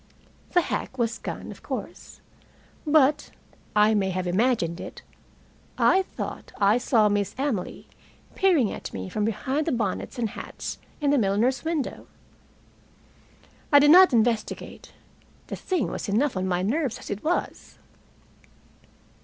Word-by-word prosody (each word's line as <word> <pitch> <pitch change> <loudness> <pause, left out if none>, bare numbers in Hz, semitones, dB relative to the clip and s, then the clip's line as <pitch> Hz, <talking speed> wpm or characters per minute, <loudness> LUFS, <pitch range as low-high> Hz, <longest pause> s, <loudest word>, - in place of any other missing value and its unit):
The 355 - +5
hack 265 - -4
was 230 -1 -1
gone, - - -6
of - - -12
course. - - -7 0.7
But 295 -1 +3 0.5
I 210 +1 +5
may 195 -2 +1
have 185 0 -2
imagined 180 -3 +1
it - - -9 0.7
I 380 - +4
thought 380 - -7
I 205 +4 +4
saw 225 -3 +3
Miss 205 -1 -1
Emily 260 -9 -3 0.5
peering 340 - +3
at - - -7
me 95 -1 -5
from 210 - -1
behind 265 +8 -1
the - - +1
bonnets 225 +1 -2
and 230 -3 -1
hats - - -7 0.2
in 285 -1 +2
the 285 - +3
milliner's 225 +5 +1
window. 320 -4 -3 1.6
I 285 - +8
did 290 +1 +6
not 370 +2 +8
investigate. 230 -2 -1 0.5
The - - -6
thing 360 - -2
was - - -5
enough 250 +6 +1
on 185 0 -1
my 180 0 0
nerves 260 +4 -1
as - - -9
it 205 +1 -4
was. 345 +3 -3
235 Hz, 140 wpm, -25 LUFS, 205-290 Hz, 1.6 s, I